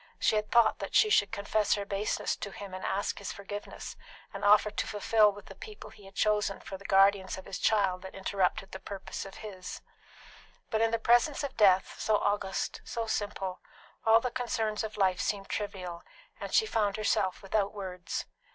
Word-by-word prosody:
She - - +2
had 210 0 0
thought 235 -2 +4
that - - -5
she 430 - +5
should 205 - +4
confess 210 0 +1
her 200 -1 -4
baseness 200 +1 -1
to 200 - -6
him, 195 -1 -9
and 185 - -6
ask 195 +1 -1
his 200 - -5
forgiveness, 205 +1 -7 0.4
and - - -6
offer 210 +1 +5
to - - -2
fulfil 210 0 +4
with 205 0 -12
the - - -10
people 430 -1 -10
he 205 - -16
had 195 0 -14
chosen 210 -2 +1
for 195 - -8
the 195 +1 -12
guardians 195 -1 +4
of 190 - -9
his 195 -1 -6
child 195 -4 +2
that 190 0 -9
interrupted 195 0 -1
purpose 195 -1 -6
of 195 - -12
his. 185 -3 -7 0.9
But 220 -1 +1
in 225 - +4
the 230 - +1
presence 240 +6 +3
of 280 - -4
death, 190 -3 +4
so 215 -1 +2
august, 200 -1 -1
so 230 -1 -3
simple, 205 -4 -3 0.4
all 225 0 +6
the 250 +1 -2
concerns 225 -4 -1
of 215 -1 -5
life 185 -3 +2
seemed 200 -1 -2
trivial, 180 -5 -4 0.4
and - - -6
she 440 - +4
found 210 - 0
herself 200 -3 0
without 200 0 0
words. 185 -3 -5
205 Hz, 190 wpm, -30 LUFS, 195-215 Hz, 0.9 s, all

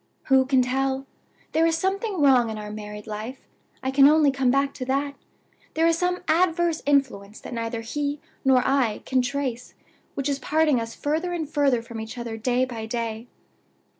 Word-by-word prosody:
"Who 265 -1 +5
can 260 -2 +4
tell? 265 +1 -1 0.5
There 325 +1 +3
is 325 0 +1
something 385 +2 -1
wrong 255 -5 +5
in 220 - -5
our 210 0 -6
married 210 0 -8
life 220 +4 -6 0.4
I 265 - 0
can 275 +1 +7
only 305 -2 +4
come 270 -2 +1
back 275 +2 +2
to 255 - -6
that. 280 +2 -1 0.6
There 325 +1 +3
is 330 0 +4
some 360 +1 -1
adverse 340 -1 +2
influence 245 -8 0
that - - -8
neither 230 0 -3
he 285 +5 -3 0.2
nor 260 -2 +4
I 260 -6 +1
can 260 -1 +2
trace 250 -2 -3 0.4
which 275 0 -2
is 280 -1 -1
parting 305 -2 +2
us 230 0 -6
further 320 +5 -1
and 325 -3 -3
further 275 -5 +1
from 230 -1 -7
each 220 +2 -8
other 235 -2 -5
day 250 +3 +1
by 230 -3 -6
day. 230 0 -4
265 Hz, 185 wpm, -24 LUFS, 235-295 Hz, 0.6 s, can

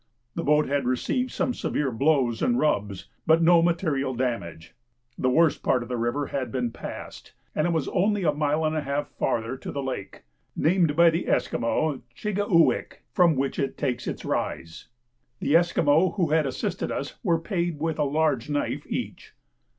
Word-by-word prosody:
The 170 - -3
boat 150 +1 +3
had 140 -2 0
received 250 - 0
some 250 - -1
severe 145 - -1
blows 130 -2 +1
and 245 -1 +2
rubs, 100 - 0 0.2
but 160 +1 +5
no 170 0 +6
material 155 -6 0
damage. 115 -11 -3 0.4
The 130 - 0
worst 160 +2 +3
part 125 - +1
of 120 - -11
the 125 - -2
river 120 +5 -1
had 135 -2 -4
been 125 -3 -1
passed, - - -9 0.2
and 155 - +1
it - - 0
was 160 -4 0
only 200 +2 +1
a 155 - +3
mile 150 +1 0
and 155 0 0
a 155 - 0
half 140 +1 -2
farther 115 +2 -2
to - - -7
the 140 - -4
lake 125 -7 -6 0.3
(named 165 -3 +2
by 170 +1 +6
the 165 +2 -2
Esquimaux 140 +4 0 0.2
Chi 210 - -2
gi 205 0 -1
uwik) 170 -5 +2
from 170 -3 +4
which 135 +1 -1
it 135 -1 -2
takes 125 -4 -2
its - - -5
rise. 80 0 -3 0.5
The 145 - +1
Esquimaux 165 0 +3
who 175 -7 0
had 155 -2 +3
assisted 130 - -3
us - - -5
were 170 - +2
paid 170 -2 -2
with 160 0 -2
a - - +3
large 145 -3 0
knife 145 -1 -2
each. - - -5
150 Hz, 185 wpm, -25 LUFS, 130-165 Hz, 0.5 s, no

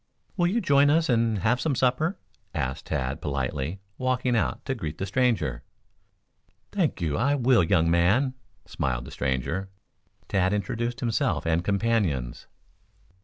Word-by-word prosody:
"Will 175 -3 +2
you 225 +6 +1
join 145 -5 +4
us 160 +1 +3
and 115 -3 +2
have 125 +3 +2
some 140 0 0
supper?" 130 +9 +1 0.4
asked 65 +1 -3
Tad 65 +3 -2
politely, 70 +5 -3 0.2
walking 130 -1 +1
out 115 - -1
to 135 - -1
greet 80 - -5
the 95 - -2
stranger. 100 - 0 1.1
"Thank - - 0
you; 75 -4 0
I 140 +3 +2
will, 125 -6 +4
young 85 -2 +3
man," 100 +11 +3 0.3
smiled 60 -3 -2
the - - -10
stranger. 65 +9 -2 0.6
Tad 95 0 +1
introduced 120 +5 -2
himself 120 0 0
and 85 +1 +1
companions. 100 - 0
105 Hz, 140 wpm, -26 LUFS, 80-130 Hz, 1.1 s, join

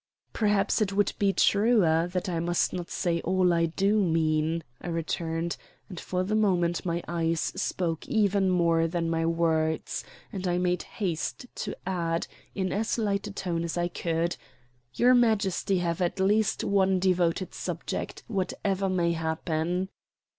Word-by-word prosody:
"Perhaps 210 -1 +2
it 200 -2 +1
would 205 +1 +2
be 200 -1 +3
truer 195 -6 +3
that 180 +1 -2
I 170 -2 -1
must 175 +1 +1
not 175 -2 -4
say 170 -2 -1
all 185 0 +2
I 165 0 +2
do 200 +5 +2
mean," 160 -1 +1 0.2
I - - -7
returned, 165 0 -2 0.3
and 180 -4 -7
for 185 0 -2
the 200 +3 -2
moment 175 -6 +2
my 170 -1 -2
eyes 165 0 0
spoke 165 -1 -2
even 200 -3 +2
more 170 -2 +3
than 165 0 -1
my 165 0 +1
words; 160 -1 0 0.3
and 190 -2 -3
I 175 0 +1
made 180 -1 +1
haste 185 +3 -3
to - - -5
add, 170 -3 -1 0.3
in 190 -2 -1
as 220 +4 0
light 205 -2 0
a - - -6
tone 175 -4 -2
as 170 +1 -3
I 175 0 0
could: 170 0 -1 0.6
"Your 250 +1 +5
Majesty 215 -5 +2
will 180 - +1
have 170 0 -1
at 175 +2 0
least 205 +3 +2
one 190 -1 +3
devoted 180 0 +1
subject, - - -4
whatever 195 -2 -1
may 175 -2 +1
happen." 165 +2 -1
180 Hz, 160 wpm, -27 LUFS, 165-195 Hz, 0.6 s, Your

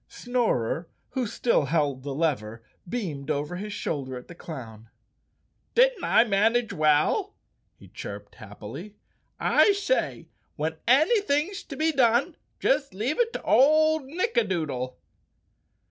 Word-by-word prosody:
Snorer, 200 - -1 0.2
who 255 -3 -2
still 205 -7 +1
held 145 -3 0
the 140 0 -5
lever, 115 -8 -2 0.3
beamed 160 - -4
over 150 +3 -2
his 210 +3 -6
shoulder 135 -9 -4
at 125 - -11
the - - -10
clown. 115 -10 -9 0.9
"Didn't - - +4
I 225 - +5
manage 225 +1 +1
well?" 155 -3 +2 0.4
he - - -16
chirped 100 0 -9
happily. 120 - -10 0.4
"I 410 - +4
say, 400 +5 -1 0.3
when 160 +1 -3
anything's 315 - +3
to 280 - -8
be 315 +3 +1
done 260 +3 +2 0.2
just 275 -5 +1
leave 245 - -2
it 470 -1 +2
to - - -5
old 310 +2 +4
Nick 365 - -2
adoodle." 140 - -1
200 Hz, 130 wpm, -26 LUFS, -, 0.9 s, I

